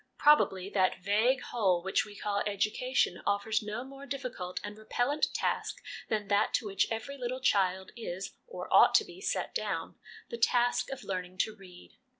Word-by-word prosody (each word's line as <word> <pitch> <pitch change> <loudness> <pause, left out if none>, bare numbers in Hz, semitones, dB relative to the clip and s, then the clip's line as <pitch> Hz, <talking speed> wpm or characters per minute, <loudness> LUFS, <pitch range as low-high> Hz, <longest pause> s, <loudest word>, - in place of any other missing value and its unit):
Probably 195 -11 +4
that 185 -2 +2
vague 220 +7 +3
whole 190 -7 +1
which 190 - +1
we 205 - -11
call 205 0 -1
' - - -1
Education 215 +6 0
' - - -8
offers 205 +2 +1
no 215 +3 -4
more 275 +1 -11
difficult 250 -9 -4
and 205 0 -6
repellent 245 +7 0
task - - -1 0.3
than 210 -2 -1
that 205 +1 +2
to 240 - -1
which 195 -1 +1
every 250 +5 -4
little 250 +1 -3
child 190 -5 +1
is 195 -5 -5
(or 485 - -7
ought - - +7
to 435 - +5
be) 365 +1 -12
set - - -2
down - - -3 0.3
the 235 - -5
task 245 +1 +2
of 270 - -6
learning 185 -1 -4
to 220 - -9
read. 185 -3 -14
215 Hz, 180 wpm, -31 LUFS, 195-250 Hz, 0.3 s, ought